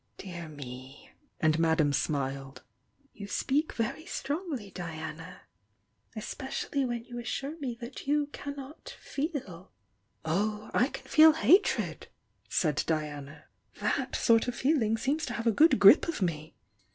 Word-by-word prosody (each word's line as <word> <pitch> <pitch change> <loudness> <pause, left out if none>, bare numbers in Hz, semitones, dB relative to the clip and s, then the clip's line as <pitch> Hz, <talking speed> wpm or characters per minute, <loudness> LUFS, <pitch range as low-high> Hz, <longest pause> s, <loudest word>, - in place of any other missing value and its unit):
"Dear 170 -4 -7
me!" 130 -2 -10 0.3
and 155 0 +2
Madame 160 -3 +3
smiled— 135 -2 -2 0.5
"you 200 -1 -8
speak 285 +8 0
very 265 +9 -3
strongly, 285 - -4
Diana! 165 -1 -7 0.7
Especially 265 +5 -3
when 240 -2 -2
you 240 0 -7
assure 275 +6 -4
me 250 -5 -4
that 245 +3 -8
you 295 +1 +2
cannot 285 +1 -8
'feel!' 265 - -5 0.3
" 100 - -40
"Oh, 210 +6 -1
I 250 - +4
can - - -9
feel 315 0 +7
hatred!" 375 +5 +3 0.4
said 150 -4 +1
Diana. 150 -2 -3 0.3
"That - - -1
sort 230 0 +3
of 245 - -2
feeling 245 -6 +2
seems 280 +7 -1
to - - -4
have 230 - -4
a 230 - +5
good 310 +9 +5
grip - - +8
of 335 - -2
me! 160 -5 -3
220 Hz, 140 wpm, -29 LUFS, -, 0.7 s, grip